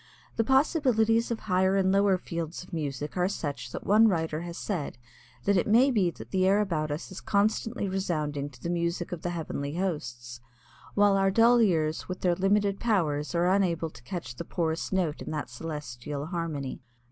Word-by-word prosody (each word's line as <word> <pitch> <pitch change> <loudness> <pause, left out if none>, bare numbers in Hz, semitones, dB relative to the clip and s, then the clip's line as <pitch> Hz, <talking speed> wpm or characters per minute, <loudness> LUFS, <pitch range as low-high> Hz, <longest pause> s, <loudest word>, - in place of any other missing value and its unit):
The 225 - +2
possibilities 240 -4 +3
of 230 -2 -3
higher 190 -1 +2
and 190 -1 +3
lower 195 -1 +4
fields 170 -1 -5
of 180 - -16
music 145 -2 -3
are 180 0 +3
such 140 -11 -4
that - - -6
one 215 +3 +6
writer 160 -5 0
has 170 0 -6
said 175 - -3 0.5
that 200 -1 +3
it 180 - +1
may 245 +6 +5
be 200 -7 +2
that 115 -8 -10
the 185 0 +2
air 200 +2 +4
about 165 -7 0
us 150 +5 -5
is 185 - -7
constantly 215 +1 0
resounding 155 -7 -2
to 125 -4 -17
the 170 - -1
music 170 0 -1
of 175 -3 -5
the 175 - -2
heavenly 155 -4 -4
hosts 120 -10 -4 0.5
while 205 -1 +5
our 195 0 +3
dull 235 +4 +5
ears 160 -7 +1
with 185 - -5
their 180 -1 +3
limited 195 +2 +1
powers 165 -9 0
are 170 +1 +3
unable 170 -5 +1
to - - -14
catch 135 +1 -6
the - - -4
poorest 165 -2 -2
note 180 -6 0
in - - -6
that 150 -4 -4
celestial 145 -1 -5
harmony. 160 -7 -4
175 Hz, 190 wpm, -28 LUFS, 155-200 Hz, 0.5 s, one